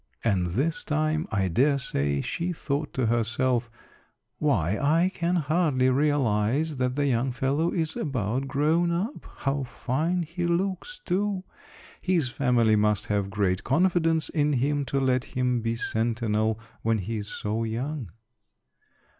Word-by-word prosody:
And 95 -6 +1
this 160 +5 0
time 155 +1 0
I 100 -3 +1
dare 140 - +3
say 70 - -1
she 175 - -2
thought 150 -2 -3
to 130 - +1
herself, 120 +2 +1 0.7
"Why, 105 - +2
I 165 +6 +3
can 175 +1 0
hardly 150 -5 +2
realize 140 0 +1
that 125 0 0
the 145 0 +1
young 130 -1 +1
fellow 140 +7 +1
is 160 -3 -1
about 130 -2 -2
grown 155 +5 +2
up; 190 +11 -3 0.2
how 135 +1 +1
fine 155 +7 -1
he 170 +2 -3
looks, 190 - -1
too; 195 +1 0 0.6
his 175 -8 +1
family 120 -3 +3
must 105 0 +2
have 100 -1 0
great 100 -2 0
confidence 165 +1 +2
in 150 -2 +1
him 140 +2 +1
to 140 - -1
let 130 -1 +2
him 125 -2 +1
be 115 +1 -1
sentinel 110 -1 0 0.2
when 115 0 +1
he 110 +3 -3
is 105 -1 -5
so 110 +2 -3
young." 120 +2 -3
135 Hz, 145 wpm, -26 LUFS, 115-160 Hz, 0.7 s, dare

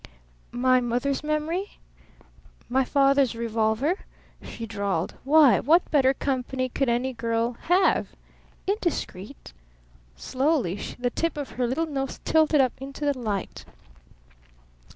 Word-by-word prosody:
"My 255 +1 +4
mother's 250 +4 -1
memory? 310 +6 -2 0.9
My 265 +2 +2
father's 275 -2 +3
revolver?" 230 - 0 0.4
she 230 - -7
drawled. 200 -5 -2
"Why, 290 -2 +6
what 330 +6 +3
better 270 -3 +4
company 260 -1 -2
could 270 +1 -1
any 250 +2 0
girl 230 0 -1 0.2
have? 365 +2 +3 0.6
Indiscreet?" 300 - -4 0.6
Slowly 260 - 0 0.2
the 245 0 -1
tip 330 +2 -2
of 285 -2 -5
her 245 -1 -1
little 270 +7 0
nose 270 -4 -4
tilted 315 -2 +4
up 255 -2 +1
into 275 +2 -6
the 285 -1 +1
light. 215 -6 -4
265 Hz, 115 wpm, -25 LUFS, 235-300 Hz, 0.9 s, Why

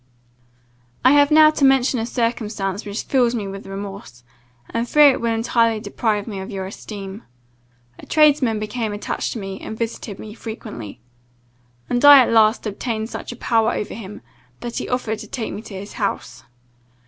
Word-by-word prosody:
"I 255 - +8
have 285 0 +5
now 310 0 +7
to 300 - -2
mention 265 -2 +4
a 225 - -2
circumstance 215 -4 -2
which 205 +1 -4
fills 245 -3 +2
me 210 -4 -3
with 195 0 -8
remorse, 195 -11 -8 0.5
and 230 +1 -2
fear 295 -2 +7
it - - -3
will 230 0 0
entirely 230 0 +1
deprive 210 0 -1
me 205 -4 -6
of 190 +3 -7
your 195 -3 -4
esteem. 195 +1 -8 0.8
A - - -12
tradesman 290 -7 +4
became 215 +1 -3
attached 205 - -3
to 230 - -5
me, 195 -1 -6
and 220 - -7
visited 225 -3 -4
me 215 -1 -9
frequently, 215 - -8 0.9
and 245 +2 -1
I 290 0 +11
at - - -1
last 220 +1 +4
obtained 220 +1 -3
such - - -6
a - - -8
power 225 -1 +1
over 210 - -4
him, 210 -2 -9 0.4
that 240 -1 -5
he - - -5
offered 230 -4 -2
to - - -9
take 230 -4 -4
me - - -5
home - - -22
to 200 - -9
his 200 +2 -8
house. 130 - -4
220 Hz, 185 wpm, -21 LUFS, 200-240 Hz, 0.9 s, I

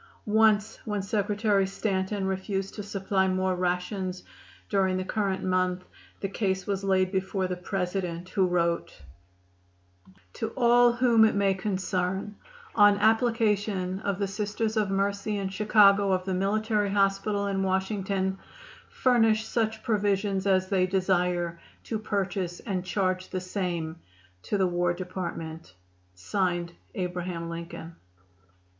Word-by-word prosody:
Once 220 0 +3
when 210 -1 -2
Secretary 205 0 +1
Stanton 195 0 -2
refused 190 0 -2
to 210 - -6
supply 195 -1 0
more 185 0 +1
rations 180 +1 -2 0.4
during 190 -2 +1
the 185 - -3
current 195 -2 -1
month 185 0 0 0.4
the 195 - -1
case 190 -1 -1
was 195 -1 -2
laid 185 -1 +2
before 190 0 -1
the 185 0 -2
President, 180 -1 -3
who 190 -1 +2
wrote: 170 -1 -1 1.3
"To 225 0 -4
all 240 -1 +5
whom 240 -2 +4
it 220 - +4
may 200 -1 +3
concern: 190 0 -2 0.4
On 205 -1 +6
application 210 -4 +1
of 200 -2 -2
the 200 - 0
Sisters 210 +2 -2
of 210 -3 +1
Mercy 200 +2 -1
in 195 -1 -2
Chicago 200 -1 +4
of 185 -1 0
the 190 - -1
Military 205 +2 +1
Hospital 200 +1 +1
in 195 -1 -1
Washington 190 0 -1 0.5
furnish 225 -3 +3
such 220 -1 -1
provisions 200 -3 0
as 190 -1 +3
they 185 -2 +2
desire 180 -2 0 0.2
to 220 - -3
purchase 190 -4 -2
and 185 -4 -3
charge 185 -1 -1
the 185 - -2
same 175 -3 -3 0.4
to 205 - -2
the 190 - +3
War 175 -1 +1
Department. 170 - -6 1.2
ABRAHAM 180 -2 -3
LINCOLN." 170 0 -7
195 Hz, 125 wpm, -27 LUFS, 185-205 Hz, 1.3 s, On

